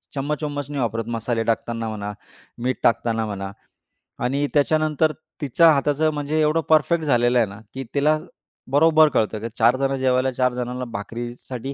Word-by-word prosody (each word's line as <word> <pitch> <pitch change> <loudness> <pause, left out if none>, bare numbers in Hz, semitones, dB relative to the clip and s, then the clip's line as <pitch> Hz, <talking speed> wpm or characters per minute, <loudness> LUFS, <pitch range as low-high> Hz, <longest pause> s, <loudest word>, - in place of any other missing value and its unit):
चम्मच-वम्मच 145 0 -3
नाही 145 -2 -3
वापरत 115 -1 -2
मसाले 115 0 -1
टाकताना 115 0 -2
म्हणा, 105 -1 -4 0.5
मीठ 130 +1 0
टाकताना 115 -1 +1
म्हणा. 100 -2 -5 0.7
आणि 140 +3 0
त्याच्यानंतर 155 +1 +2 0.3
तिच्या 160 +4 +5
हाताचं 145 +2 +1
म्हणजे 150 +1 -1
एवढं 155 +2 +2
परफेक्ट 160 +1 +3
झालेलं 120 -3 +3
आहे 115 -3 +3
ना, 100 +2 -10
की 135 0 -5
तिला 150 +2 +3 0.5
बरोबर 155 +1 +5
कळतं, 110 0 0
की 115 - -4
4 120 +2 +4
जण 135 0 0
जेवायला 130 0 +2
4 125 0 +1
जणांना 125 +1 -4
भाकरीसाठी 120 +5 -6
130 Hz, 155 wpm, -22 LUFS, 115-150 Hz, 0.7 s, तिच्या